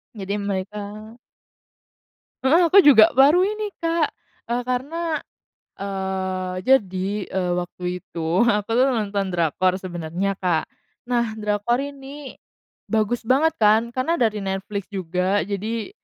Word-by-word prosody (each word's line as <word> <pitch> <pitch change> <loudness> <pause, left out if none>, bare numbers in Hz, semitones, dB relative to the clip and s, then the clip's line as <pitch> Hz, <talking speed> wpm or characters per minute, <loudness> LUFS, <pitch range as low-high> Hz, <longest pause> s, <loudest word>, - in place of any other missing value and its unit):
Jadi 200 -1 -4
mereka 200 0 -3 1.7
Heeh, 330 +6 +4
aku 395 - +7
juga 225 -7 +8
baru 290 +7 +6
ini, 420 +1 -2
Kak 330 -1 +1 0.4
e 235 - -2
karena, 260 +7 -3 0.7
eee, 190 -1 -3
jadi, 195 -8 +2 0.2
eee, 185 -2 -1
waktu 180 0 -8 0.2
itu 170 +5 0
aku 210 -3 +1
tuh 255 - +5
nonton 205 -3 -1
drakor 175 +2 +1
sebenarnya, 180 +2 -3
Kak. 175 -5 0 0.4
Nah, 235 -2 0
drakor 210 +3 0
ini 280 0 -8 0.5
bagus 225 +2 0
banget 305 +7 +2
kan 220 +2 +4
karena 255 +7 -1
dari 215 -3 +2
Netflix 195 0 -4
juga, 185 +2 0
jadi 215 +3 -3
210 Hz, 120 wpm, -22 LUFS, 190-260 Hz, 1.7 s, juga